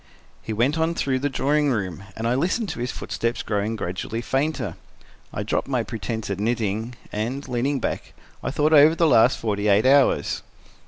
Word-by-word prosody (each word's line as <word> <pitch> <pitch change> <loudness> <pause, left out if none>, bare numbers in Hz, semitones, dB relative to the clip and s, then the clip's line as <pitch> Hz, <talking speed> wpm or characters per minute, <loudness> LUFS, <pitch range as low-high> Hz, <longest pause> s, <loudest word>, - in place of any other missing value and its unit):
He - - -6
went 125 +9 +1
on 165 +1 +1
through 130 -4 0
the 145 +2 0
drawing 145 +2 +1
room, 100 -6 -2
and 115 +1 -2
I 120 - +2
listened 185 - 0
to - - -5
his 125 +1 -2
footsteps 115 0 -3
growing 105 +1 -1
gradually 95 +3 -4
fainter. 145 +5 -1 0.6
I - - -3
dropped - - -1
my 130 -4 0
pretense 110 -1 -4
at 100 - -3
knitting 110 +1 -1 0.2
and, 120 +7 -3
leaning 130 +3 0
back, - - -4 0.3
I - - -2
thought 150 +3 +1
over 155 +2 +7
the 165 - +3
last 120 -3 +5
forty 105 -2 -1
eight 105 +3 +4
hours. 135 0 +3
120 Hz, 180 wpm, -24 LUFS, 110-140 Hz, 0.6 s, over